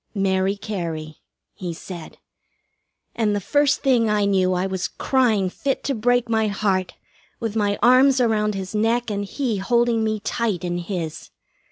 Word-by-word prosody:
"Mary 195 0 +1
Cary," 165 -7 -5 0.4
he 175 -4 -6
said. 170 -1 -9 1.0
And 215 -3 +1
the - - 0
first 290 +7 +1
thing 245 -5 +3
I 210 -1 +2
knew 190 -2 +2
I 180 +1 0
was 190 -1 -2
crying 230 -8 +1
fit 270 +9 -2
to 275 - -1
break 245 +1 +1
my 220 -1 +1
heart, 195 -2 -1 0.4
with 225 -2 -3
my 205 -2 +1
arms 260 +2 +6
around 215 -3 +1
his 190 0 -5
neck, 225 +2 +1
and 205 0 -2
he 230 +1 -2
holding 235 +3 +2
me 215 -1 -1
tight 205 -4 -2
in 175 0 -2
his. 170 -3 -5
210 Hz, 160 wpm, -22 LUFS, 190-235 Hz, 1.0 s, arms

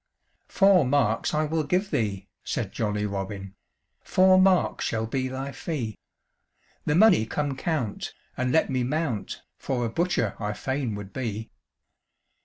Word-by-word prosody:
"Four 195 -5 +5
marks 125 -4 +1
I 155 0 +1
will 160 +1 0
give 185 +7 0
thee," 100 -4 -1 0.2
said - - -3
jolly 105 -1 -1
Robin, 100 -1 -4 0.5
"Four 185 0 +5
marks 185 -1 +3
shall 110 -1 -1
be 130 +3 -1
thy 135 +2 -4
fee; 130 - -4 0.9
The 150 - +3
money 180 - +6
come 145 +2 -2
count, 135 -7 -2 0.2
and 125 0 0
let 160 - +3
me 130 -1 +1
mount, 135 -5 -2 0.2
For 125 -3 -1
a - - -1
butcher 140 - 0
I 105 -1 -2
fain 130 0 -2
would 100 -1 -8
be." 110 -4 -4
130 Hz, 145 wpm, -26 LUFS, 110-155 Hz, 0.9 s, money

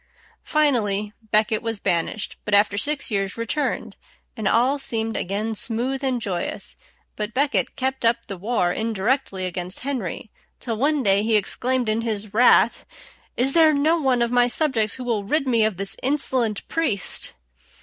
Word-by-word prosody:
Finally 215 -9 +1
à - - -44
Becket 215 +1 +2
was 225 -2 -3
banished; 175 +4 -1
but 210 - +1
after 205 0 +4
six 285 +6 -1
years 195 0 -1
returned, 230 +6 -2 0.4
and 220 -4 -2
all 255 +7 +2
seemed 225 -4 -2
again 210 +4 -2
smooth 245 +6 0
and 260 -2 0
joyous; 185 -6 -4 0.4
but 210 +2 -4
Becket 285 +2 +1
kept 265 0 -2
up 230 0 +2
the 200 - -6
war 185 -2 0
indirectly 220 -2 -1
against 180 +1 -4
Henry, 245 -7 -4 0.3
till 230 -3 -3
one 285 +3 +1
day 200 -1 +4
he 220 +1 +1
exclaimed 245 +4 0
in 215 +1 0
his 215 -3 -3
wrath, 245 +3 +4 0.5
"Is 265 +2 +3
there 320 -2 +5
no 310 +4 +2
one 255 -4 +2
of 235 - -2
my 245 0 +4
subjects 240 -6 +1
who 255 - -7
will 230 -4 -1
rid 275 +7 0
me 230 -3 +3
of 215 -4 0
this 195 +1 -3
insolent 255 -6 0
priest?" 270 - 0
230 Hz, 165 wpm, -23 LUFS, 205-265 Hz, 0.5 s, there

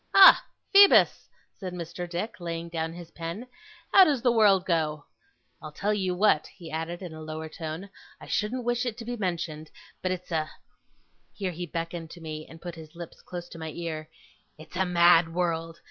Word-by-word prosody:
'Ha! 390 -1 +10 0.3
Phoebus!' 400 0 +7 0.3
said 185 -3 -5
Mr. 175 +1 -6
Dick, 180 +6 -4
laying 170 -1 -4
down 165 -1 -2
his 170 0 -10
pen. 170 +8 -6 0.5
'How 390 - +10
does 280 -7 +1
the 245 - +5
world 205 -5 +4
go? 155 -4 0 0.6
I'll 155 -1 -8
tell 205 +7 -1
you 190 -3 -1
what,' 180 -5 +3
he 170 -4 -12
added, 165 +3 -4
in 175 -3 -7
a 155 - -9
lower 155 0 -6
tone, 160 +4 -6 0.3
'I - - -11
shouldn't 235 +4 -1
wish 240 0 +1
it 240 -3 -3
to 230 - -8
be 245 +1 -3
mentioned, 165 -6 -3 0.3
but 185 - -1
it's 180 -1 -5
a 155 -1 0 0.4
' - - -41
here 190 -3 -2
he 175 +1 -6
beckoned 165 0 -5
to 175 - -11
me, 155 -1 -7
and 165 - -12
put 175 0 -7
his 160 0 -12
lips 170 0 -9
close 175 -1 -7
to 165 - -10
my 160 0 -5
ear 160 -2 -5 0.5
'it's 155 +3 -13
a 190 +1 +1
mad 170 -1 +5
world. 165 -2 -1
170 Hz, 195 wpm, -27 LUFS, 160-190 Hz, 0.6 s, Ha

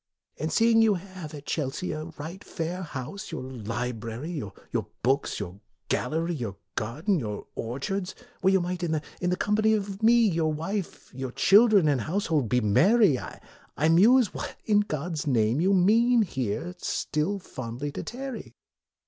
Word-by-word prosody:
And 155 +2 -2
seeing 225 +6 +4
you 220 -2 +4
have 185 -4 -8
at 145 -1 -10
Chelsea 150 +4 -2
a 155 0 -4
right, 165 +7 -7
fair 170 +2 -4
house, 170 +6 -6
your 165 - -4
library, 120 +2 -4
your 120 - -5 0.2
books, 135 +3 +1
your 100 -1 -6 0.3
gal 125 - 0
lery, 165 +3 -1
your 115 - -4 0.2
garden, 155 - -1
your 105 -5 -5
orchards, 180 +11 -3 0.3
where 190 - +4
you 190 - +4
might, 180 0 -3
in 170 -2 -1 0.3
the 180 0 +1
company 215 +3 +2
of 200 -1 -4
me 230 0 +5
your 165 -4 +1
wife, 170 +5 -4
your 130 0 -5
children, 205 - +5
and 140 -5 +2
household, 160 - 0
be 125 0 +2
merry, 175 - +4
I 155 +4 -4
muse 215 +7 +5
what - - -5
in 210 -2 +4
God's 155 -5 -3
name 120 +1 +2
you 190 +3 +3
mean 225 +5 +4
here 135 - -3
still 155 +7 -1
fondly 130 -5 -6
to - - -5
tarry." 260 0 -7
165 Hz, 155 wpm, -27 LUFS, 130-200 Hz, 0.3 s, me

